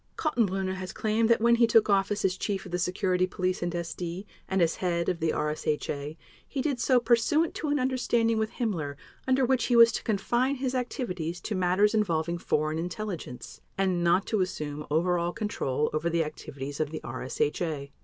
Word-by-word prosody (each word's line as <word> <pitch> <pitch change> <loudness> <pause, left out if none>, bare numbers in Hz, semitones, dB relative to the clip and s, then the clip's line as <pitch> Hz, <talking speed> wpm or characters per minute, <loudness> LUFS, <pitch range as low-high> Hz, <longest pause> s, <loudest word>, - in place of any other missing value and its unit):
Kaltenbrunner 195 - 0
has 185 0 -6
claimed 220 +1 +1
that 235 - +4
when 235 +1 +5
he 235 -1 +5
took 225 -1 +5
office 200 0 +1
as 185 -1 +2
Chief 195 0 -3
of 185 - -9
the 180 - -1
Security 185 0 +1
Police 185 0 -2
and 175 0 -1
SD 170 +2 -4 0.2
and 190 - +1
as 165 -2 +2
Head 170 -2 0
of 180 -2 -1
the 160 -1 +1
RSHA 150 0 -2 0.3
he 280 - -5
did 280 -5 -1
so 250 +1 +4
pursuant 250 +7 +2
to 310 - -4
an 290 0 +2
understanding 240 -4 +1
with 220 0 -2
Himmler 165 - -2 0.3
under 260 0 +3
which 255 -2 +2
he 245 - +2
was 230 0 +8
to - - -3
confine 240 +6 0
his 260 -1 -2
activities 180 - -3
to 220 - -4
matters 185 +3 +3
involving 170 -5 0
foreign 155 0 0
intelligence, 180 - -6 0.2
and 185 -3 +1
not 175 +3 +3
to 215 -3 0
assume 150 -5 -4
over 175 +4 +2
all 170 +1 -1
control 150 -9 -1
over 155 +2 0
the 165 0 +1
activities 145 -2 -7
of 155 -2 0
the 155 - -6
RSHA. 140 +4 -2
185 Hz, 190 wpm, -28 LUFS, 165-225 Hz, 0.3 s, was